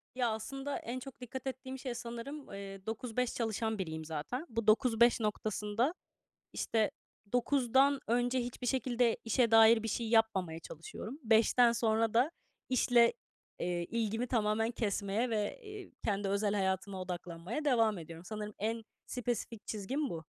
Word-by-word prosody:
Ya, 245 -2 +2
aslında 270 +6 -3
en 245 +3 -5
çok 265 -1 -10
dikkat 260 +2 -6
ettiğim 260 0 -5
şey 255 -3 -4
sanırım, 240 +3 -6
eee, 195 -1 -8
9-5 235 +2 -2
çalışan 220 -1 -1
biriyim 160 -3 -4
zaten. 160 - -4
Bu 230 -2 -3
9-5 235 +1 +5
noktasında, 215 - 0 0.6
işte, 220 -2 +1 0.4
9'dan 265 +2 +3
önce 245 +2 +2
hiçbir 245 +1 -5
şekilde 245 -2 +2
işe 230 +1 +3
dair 225 0 +7
bir 225 - -2
şey 225 +1 -1
yapmamaya 195 -8 +2
çalışıyorum. 210 - -8
5'ten 230 +2 +5
sonra 225 -1 +1
da 250 +6 +4 0.4
işle, 245 -2 +5 0.5
eee, 175 0 -1
ilgimi 225 +3 -1
tamamen 225 -1 +1
kesmeye 215 +1 -1
ve, 215 - -1
eee, 415 -3 -9
kendi 200 -2 0
özel 200 +1 +1
hayatıma 190 -1 -1
odaklanmaya 180 - -4
devam 225 -7 +3
ediyorum. 165 +1 -9
Sanırım 210 +1 -5
en 225 +3 -1 0.2
spesifik 240 -3 -3
çizgim 255 +8 -2
bu. 165 -1 -5
225 Hz, 140 wpm, -33 LUFS, 205-245 Hz, 0.6 s, dair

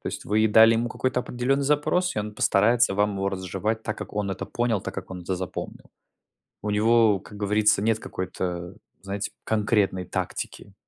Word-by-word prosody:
То - - -11
есть - - -6
вы 105 +2 +1
и 110 - +5
дали 110 +2 +7
ему 115 +1 0
какой-то 130 +2 -1
определенный 125 +3 -1
запрос, 150 +3 +1
и - - +1
он 105 0 -4
постарается 115 +2 +3
вам 105 0 +1
его 95 0 0
разжевать, 95 +4 -3
так 110 -1 -4
как - - -8
он 100 -2 -1
это 95 - -4
понял, 120 -4 0
так - - -6
как - - -7
он 90 - -6
это 95 +1 -2
запомнил. 90 -2 -7 0.7
У 105 - -3
него, 110 0 +4
как 105 +3 -13
говорится, 105 0 +3
нет 110 0 +1
какой-то, 90 -1 -5 0.3
знаете, 100 +1 -4
конкретной 105 -4 +1
тактики. 100 - -5
105 Hz, 190 wpm, -25 LUFS, 95-115 Hz, 0.7 s, дали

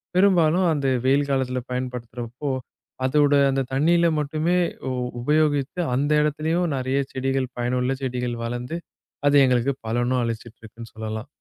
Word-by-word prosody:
பெரும்பாலும் 180 -2 +4
அந்த 140 -3 -1 0.2
வெயில் 140 +2 +3
காலத்துல 130 -1 0
பயன்படுத்துறப்போ, 125 +1 -5 0.6
அதோட 145 +2 +3 0.2
அந்தத் 135 -1 -2
தண்ணில 170 +5 +3
மட்டுமே 155 +4 0 0.3
உ - - -1 0.3
உபயோகிச்சு 150 +3 +1
அந்த 145 +3 0
இடத்துலயும் 160 +3 0
நறையா 130 +2 0
செடிகள் 135 -1 -1
பயனுள்ள 125 +1 0
செடிகள் 125 -2 -2
வளர்ந்து, 120 +6 -4 0.5
அது 145 - +4
எங்களுக்குப் 130 +1 +1
பலனும் 120 +2 +1
அளிச்சிட்டு 115 0 -5
இருக்குன்னு 115 +1 -11
சொல்லலாம். 110 +2 -5
130 Hz, 125 wpm, -23 LUFS, 125-150 Hz, 0.6 s, பெரும்பாலும்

